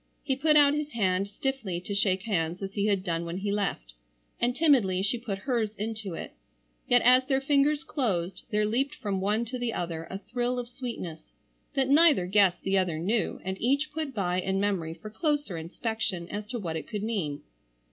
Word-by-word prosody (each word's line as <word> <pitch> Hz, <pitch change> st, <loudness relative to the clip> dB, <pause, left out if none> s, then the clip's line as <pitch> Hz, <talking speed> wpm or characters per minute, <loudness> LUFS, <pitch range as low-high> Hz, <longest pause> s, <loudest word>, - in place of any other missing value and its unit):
He 270 Hz, -, 0 dB
put 300 Hz, +3 st, +4 dB
out 285 Hz, -1 st, +6 dB
his 300 Hz, 0 st, -3 dB
hand 195 Hz, -3 st, +1 dB
stiffly 210 Hz, -4 st, -3 dB
to 200 Hz, -, -5 dB
shake 195 Hz, -2 st, +1 dB
hands 175 Hz, -4 st, -1 dB
as 195 Hz, 0 st, -4 dB
he 205 Hz, 0 st, 0 dB
had 200 Hz, -3 st, +1 dB
done 170 Hz, -3 st, -1 dB
when 170 Hz, +1 st, -4 dB
he 200 Hz, +1 st, -2 dB
left, 195 Hz, -, -2 dB, 0.5 s
and 245 Hz, +1 st, +1 dB
timidly 245 Hz, -, +3 dB
she 230 Hz, +4 st, 0 dB
put 215 Hz, -5 st, -4 dB
hers 230 Hz, -5 st, 0 dB
into 210 Hz, -4 st, -4 dB
it, -, -, -7 dB, 0.5 s
yet 245 Hz, 0 st, +5 dB
as 255 Hz, +1 st, +6 dB
their 270 Hz, -1 st, +2 dB
fingers 285 Hz, +2 st, +2 dB
closed 195 Hz, -, -1 dB
there 210 Hz, -1 st, +2 dB
leaped 270 Hz, +7 st, 0 dB
from 195 Hz, -3 st, -2 dB
one 210 Hz, +4 st, +1 dB
to 250 Hz, +2 st, -5 dB
the 240 Hz, -2 st, -1 dB
other 165 Hz, -2 st, -3 dB
a 190 Hz, -, -4 dB
thrill 245 Hz, +4 st, -2 dB
of 245 Hz, -1 st, -3 dB
sweetness, 230 Hz, -11 st, -7 dB, 0.4 s
that 270 Hz, -2 st, +2 dB
neither 290 Hz, -, +6 dB
guessed 190 Hz, -1 st, +3 dB
the 195 Hz, 0 st, +2 dB
other 175 Hz, -4 st, 0 dB
knew 205 Hz, +8 st, 0 dB
and 190 Hz, +1 st, -4 dB
each 280 Hz, +5 st, +1 dB
put 310 Hz, -2 st, -3 dB
by 185 Hz, -6 st, 0 dB
in 190 Hz, +1 st, 0 dB
memory 185 Hz, -5 st, -1 dB
for 215 Hz, +4 st, -10 dB
closer 290 Hz, -, -1 dB
inspection 180 Hz, +1 st, -3 dB
as 205 Hz, 0 st, -5 dB
to 245 Hz, -, -3 dB
what 170 Hz, -7 st, -3 dB
it 160 Hz, -, -5 dB
could 210 Hz, -2 st, -4 dB
mean. 180 Hz, -11 st, -2 dB
210 Hz, 200 wpm, -28 LUFS, 185-255 Hz, 0.5 s, out